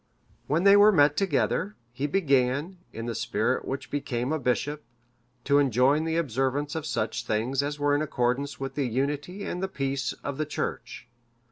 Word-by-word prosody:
When 160 +5 +1
they 200 0 +7
were 205 +1 +7
met 145 -5 +4
together, 195 +2 0 0.2
he 130 +4 -2
began, 145 +1 +1
in 115 +1 -6
the 120 - -3
spirit - - -1
which 135 +1 -5
became 135 -1 -2
a 160 - -1
bishop, 145 +4 -1 0.6
to 140 0 +4
enjoin 135 +3 +3
the 165 0 0
observance 140 0 -1
of 160 -1 -4
such 110 - -2
things 115 +5 0
as 145 +1 -3
were 145 0 +1
in 145 - +2
accordance 140 -1 -1
with 135 -1 -4
the 140 -2 -1
unity 145 - -2
and 180 - -4
the 190 - 0
peace 135 -7 -2
of 140 0 -4
the 155 - 0
Church. 125 -4 -5
140 Hz, 175 wpm, -27 LUFS, 130-155 Hz, 0.6 s, they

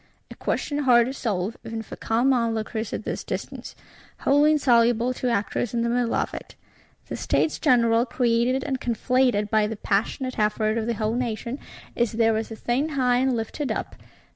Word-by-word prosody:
_ - - -34 0.3
A - - -8
question 290 -1 -2
hard 245 -4 +5
to 260 - -4
solve, 210 -4 -2
even 225 0 -5
for - - -9
calm 240 +4 +1
onlookers 225 -2 -1
at - - -4
this - - -4
distance; - - -6 0.5
wholly 290 +2 +4
insoluble 240 -3 +3
to 250 0 -2
actors 235 +1 -1
in 230 - +1
the 235 - 0
middle 240 -1 0
of - - -1
it. - - -8 0.5
The - - -5
States 315 - 0
General, 235 -4 +3
created 245 +2 +1
and 265 -3 -3
conflated 245 -3 +1
by 215 -1 +3
the 220 0 -5
passionate 230 +6 -1
effort 215 +1 +1
of 220 - -3
the 235 - 0
whole 215 +1 -1
nation, 240 +2 -3 0.4
is 235 -1 0
there 225 0 +3
as 220 - -3
a 225 - -6
thing 250 +7 -1
high 250 -2 +3
and 260 0 +2
lifted 235 +5 -3
up. - - -4
235 Hz, 190 wpm, -24 LUFS, 225-255 Hz, 0.5 s, hard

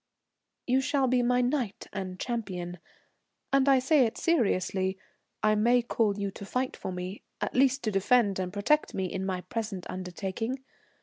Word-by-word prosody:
"You 260 +1 +3
shall 280 0 +1
be 255 -1 +3
my 250 +1 +3
knight 245 -4 -1
and 185 -2 -5
champion, 180 -8 -4 0.7
and 275 0 +4
I 270 - +7
say 265 0 +4
it 220 - -7
seriously. 190 - +1 0.5
I 215 0 +5
may 235 +3 +4
call 220 -4 +1
you 200 -1 -2
to 200 - -10
fight 255 +6 -2
for - - -5
me, 180 +2 -5 0.2
at - - -2
least 270 +1 +3
to 215 - 0
defend 200 0 +3
and 180 -1 -2
protect 210 +10 +1
me 190 - 0
in 185 +1 -3
my 185 -1 -2
present 215 -5 -4
undertaking. 195 +8 -4
215 Hz, 170 wpm, -29 LUFS, 190-255 Hz, 0.7 s, I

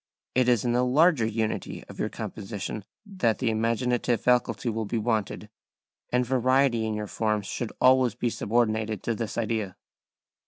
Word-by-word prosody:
It 125 -1 +3
is 120 -1 +2
in 120 - +2
the 125 +1 +2
larger 140 -1 +4
unity 110 0 -3
of - - -12
your - - 0
composition 105 0 -6 0.2
that 185 - 0
the 120 -3 0
imaginative 115 +2 0
faculty 125 0 +1
will 110 -1 -1
be 115 - -1
wanted, 110 -2 -1 0.6
and 125 0 +2
variety 130 -2 +2
in 110 - -2
your 105 0 -3
forms 105 0 -1
should 120 +1 -4
always 130 -2 +4
be 120 -1 -1
subordinated 110 -3 0
to 115 - 0
this 115 -1 -4
idea. 110 -4 -2
115 Hz, 160 wpm, -27 LUFS, 110-125 Hz, 0.6 s, larger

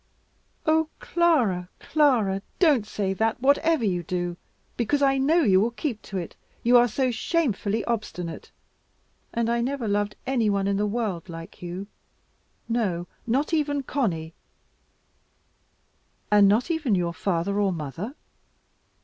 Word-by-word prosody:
"Oh 315 0 +3
Clara, 245 - +1
Clara, 235 -11 +2 0.2
don't 285 - +3
say 195 -2 -1
that, 220 +4 0
whatever 285 +1 +3
you 180 -3 0
do, 175 +1 -3 0.4
because 280 +5 +1
I 270 -1 +3
know 315 +5 +3
you 190 -6 +5
will 225 - +2
keep 240 -1 -4
to 195 - -6
it, 175 -3 -5 0.3
you 240 +1 +4
are 245 0 +7
so 255 +2 0
shamefully 225 - 0
obstinate. 190 -7 -4 0.8
And 235 -1 0
I 235 0 +1
never 255 -1 -2
loved 205 0 0
any 240 -5 +1
one 200 -1 +1
in 200 0 +1
the 210 +1 +1
world 205 -6 -3
like 165 0 -9
you; 180 +2 -5 0.8
no, 200 -7 -1 0.2
not 275 +8 0
even 290 -3 +1
Conny." 175 - -2 2.0
"And 205 -1 +7
not 220 - +2
even 300 -10 +1
your 175 -2 0
father 190 +3 -1
or 200 -2 +2
mother?" 170 - -5
220 Hz, 140 wpm, -25 LUFS, 190-270 Hz, 2.0 s, are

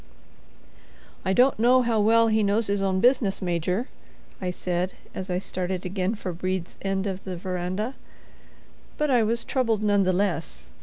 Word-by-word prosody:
"I 190 - 0
don't 250 +4 +4
know 250 +2 +5
how 230 -2 +1
well 225 +2 +5
he 220 0 +2
knows 210 +2 +2
his 200 0 0
own 190 -1 +1
business, 240 -5 +3
Major," 180 - -1 0.5
I 185 - -1
said 180 0 -2 0.2
as 190 0 -6
I 180 - 0
started 185 0 -3
again 190 +3 -1
for 185 -4 -5
Brede's 185 0 -3
end 195 0 -1
of 190 -1 -4
the 185 -2 -5
veranda. 185 +6 -3 1.0
But 300 -2 +1
I 245 -2 +4
was 230 +2 0
troubled 230 -6 0
none 205 -1 +3
the 185 -1 +3
less. 180 -4 -2
195 Hz, 165 wpm, -25 LUFS, 185-225 Hz, 1.0 s, know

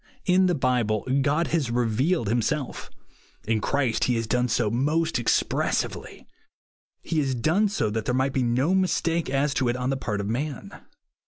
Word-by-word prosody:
In 185 +1 +4
the 180 - +1
Bible 125 -6 0
God 150 +4 +1
has 155 -7 0
revealed 120 - 0
himself. 120 +5 -2 0.6
In 110 -1 +1
Christ 130 -3 0
he 125 - +1
has 115 0 -1
done 125 +3 +1
so 110 -3 0
most 150 +5 0
expressively. 120 - -1 0.8
He 160 - -1
has 135 -3 0
done 170 - +2
so 110 - -1
that 110 0 -3
there 125 - 0
might 130 +1 0
be 130 - +1
no 125 +8 +1
mistake 170 -4 0
as 140 +1 +1
to 130 -3 0
it 120 - -1
on 125 +1 -1
the 135 - -1
part 105 -6 -3
of 100 - -3
man. 130 +4 -4
130 Hz, 175 wpm, -25 LUFS, 115-155 Hz, 0.8 s, In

